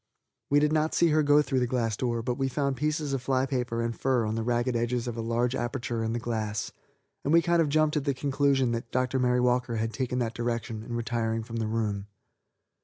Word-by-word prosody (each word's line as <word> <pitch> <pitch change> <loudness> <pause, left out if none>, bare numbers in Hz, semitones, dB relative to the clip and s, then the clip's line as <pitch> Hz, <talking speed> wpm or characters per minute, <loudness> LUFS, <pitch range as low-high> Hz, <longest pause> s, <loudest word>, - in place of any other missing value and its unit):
We 145 - +5
did 150 +1 +2
not 155 0 +1
see 170 - +4
her 155 0 +3
go 145 0 +5
through 135 -3 0
the 125 - +1
glass 115 -3 0
door, 120 -1 -1
but 125 +1 0
we 135 +1 -1
found 140 +1 -1
pieces 150 +1 -1
of 135 - -1
fly 130 0 +1
paper 125 -3 -2
and 115 0 -2
fur 130 -4 +1
on 110 - -1
the 115 - -1
ragged 120 +2 0
edges 120 +1 -1
of 120 - -3
a 115 - -3
large 120 +2 0
aperture 120 -2 -2
in 110 - -1
the 120 - -1
glass, 110 -3 -3 0.5
and 145 - 0
we 165 +1 +5
kind 170 -1 +3
of 155 - +1
jumped 155 +1 +2
at 145 - -2
the 140 -2 +1
conclusion 135 -2 +1
that 115 0 -3
Dr. 130 +1 0
Mary 125 0 +2
Walker 125 -1 +1
had 115 0 -2
taken 125 -1 -2
that 120 -2 -1
direction 115 -2 -3
in 120 +2 -6
retiring 115 -1 -1
from 115 +1 -6
the 110 -1 -1
room. 105 -3 -2
125 Hz, 240 wpm, -28 LUFS, 115-135 Hz, 0.5 s, We